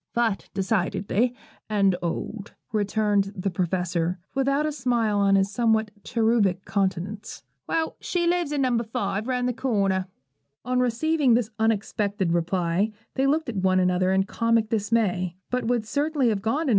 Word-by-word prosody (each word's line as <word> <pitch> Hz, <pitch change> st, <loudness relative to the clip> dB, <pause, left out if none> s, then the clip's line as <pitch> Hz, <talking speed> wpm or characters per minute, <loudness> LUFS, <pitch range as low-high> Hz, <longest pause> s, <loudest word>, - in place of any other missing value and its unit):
'Fat, 230 Hz, -4 st, 0 dB
decidedly, 200 Hz, +4 st, 0 dB, 0.3 s
and 200 Hz, -3 st, +3 dB
old,' 195 Hz, +4 st, -4 dB, 0.2 s
returned 205 Hz, -1 st, +1 dB
the 190 Hz, +1 st, -2 dB
Professor, 180 Hz, -1 st, -1 dB, 0.2 s
without 275 Hz, +2 st, +1 dB
a 305 Hz, -, 0 dB
smile 240 Hz, -6 st, 0 dB
on 200 Hz, 0 st, +4 dB
his 195 Hz, 0 st, +2 dB
somewhat 220 Hz, -1 st, +1 dB
cherubic 220 Hz, -5 st, +1 dB
countenance. 195 Hz, +2 st, -2 dB, 0.2 s
'Well, 325 Hz, -1 st, -1 dB
she 350 Hz, -1 st, -1 dB
lives 345 Hz, -3 st, +1 dB
No. 260 Hz, -5 st, +1 dB
5, 225 Hz, -2 st, -2 dB
round 250 Hz, -1 st, 0 dB
the 250 Hz, -, 0 dB
corner.' 200 Hz, -6 st, 0 dB, 0.6 s
On 250 Hz, 0 st, +1 dB
receiving 250 Hz, +2 st, +2 dB
this 235 Hz, -2 st, 0 dB
unexpected 205 Hz, -4 st, 0 dB
reply, 175 Hz, +3 st, +1 dB, 0.2 s
they 270 Hz, 0 st, +1 dB
looked 310 Hz, +3 st, +1 dB
at 230 Hz, -4 st, -4 dB
one 185 Hz, 0 st, +3 dB
another 180 Hz, 0 st, +2 dB
in 190 Hz, 0 st, +3 dB
comic 230 Hz, +1 st, +1 dB
dismay; 205 Hz, -5 st, 0 dB, 0.2 s
but 250 Hz, -1 st, 0 dB
would 235 Hz, -2 st, 0 dB
certainly 285 Hz, +1 st, +1 dB
have 205 Hz, -3 st, -1 dB
gone 225 Hz, +9 st, 0 dB
to -, -, -2 dB
No. -, -, 0 dB
215 Hz, 155 wpm, -25 LUFS, 195-245 Hz, 0.6 s, on